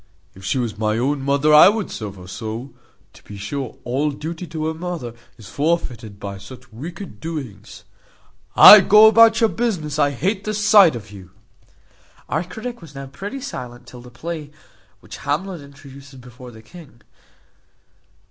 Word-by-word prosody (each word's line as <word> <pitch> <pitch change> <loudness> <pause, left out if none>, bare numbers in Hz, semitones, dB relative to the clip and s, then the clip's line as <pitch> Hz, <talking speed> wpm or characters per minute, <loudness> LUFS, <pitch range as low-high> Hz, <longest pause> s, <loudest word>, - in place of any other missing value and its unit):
If 95 - -16
she 100 - -1
was 115 -4 -3
my 110 0 0
own 135 +4 -1
mother, 140 +2 +1
I 150 +5 +9
would 210 -1 -3
serve 105 -3 -7
her 90 -1 -13
so. 110 +7 -7 0.4
To - - -19
be 105 - -11
sure 120 +5 -6
all 135 +5 -1
duty 160 +4 -7
to 155 0 -4
a 160 - -2
mother 160 -8 -6 0.2
is 110 - -13
forfeited 130 -10 -3
by 100 -1 -7
such 120 +3 -14
wicked 170 - -9
doings. 110 -11 -8 0.7
Ay, 210 - +11
go 210 +3 +6
about 225 +1 +6
your 225 - +4
business, 165 -11 -3
I 145 -1 +3
hate 190 - -2
the 215 +1 -3
sight 205 - +5
of 105 -4 -9
you." 95 -3 -13 1.0
Our 160 +3 -1
critic 220 +6 -8
was 155 -4 -14
now 135 0 -7
pretty 200 - -8
silent 125 - -8
till 125 - -13
the 125 - -14
play, 155 +4 -7 0.5
which - - -11
Hamlet 175 +3 -4
introduces 140 -1 -14
before 125 0 -13
the 110 -2 -15
king. 145 -5 -16
140 Hz, 165 wpm, -20 LUFS, 120-175 Hz, 1.0 s, Ay